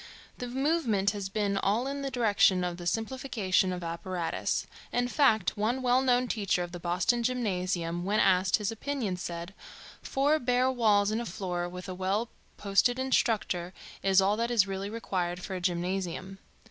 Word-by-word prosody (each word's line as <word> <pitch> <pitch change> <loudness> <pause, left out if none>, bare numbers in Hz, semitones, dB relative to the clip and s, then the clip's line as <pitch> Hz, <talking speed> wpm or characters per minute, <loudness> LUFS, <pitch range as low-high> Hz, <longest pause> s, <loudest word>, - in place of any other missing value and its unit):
The 245 - -4
movement 250 -7 +1
has 200 -2 -5
been 200 -1 0
all 210 +5 +1
in 280 +1 -3
the 275 - -2
direction 210 -7 +3
of 175 -1 -2
the 175 -1 -6
simplification 225 -4 0
of 180 -1 -4
apparatus; 170 +1 -2 0.3
in 245 0 +1
fact, 225 - +2
one 230 +5 -1
well 250 +1 +4
known 250 -1 +2
teacher 200 -6 0
of 175 - -7
the 175 - -7
Boston 180 +8 +1
Gymnasium 185 -8 -1
when 205 +3 +1
asked 185 0 +4
his 210 0 -1
opinion 225 -4 -3
said: 175 +1 -6 0.5
"Four 290 +3 +1
bare 250 0 +2
walls 210 -5 +3
and 220 +2 -1
a - - -4
floor, 175 -1 -3
with 180 +1 -8
a 185 - -4
well 195 +5 -1 0.3
posted 205 +5 +2
instructor, 215 -8 0 0.3
is 195 0 +4
all 200 +2 +2
that 235 +1 0
is 230 -5 +4
really 195 0 -4
required 180 -5 -3
for - - -5
a 180 - -4
gymnasium." 185 +1 -2
200 Hz, 170 wpm, -29 LUFS, 180-245 Hz, 0.5 s, well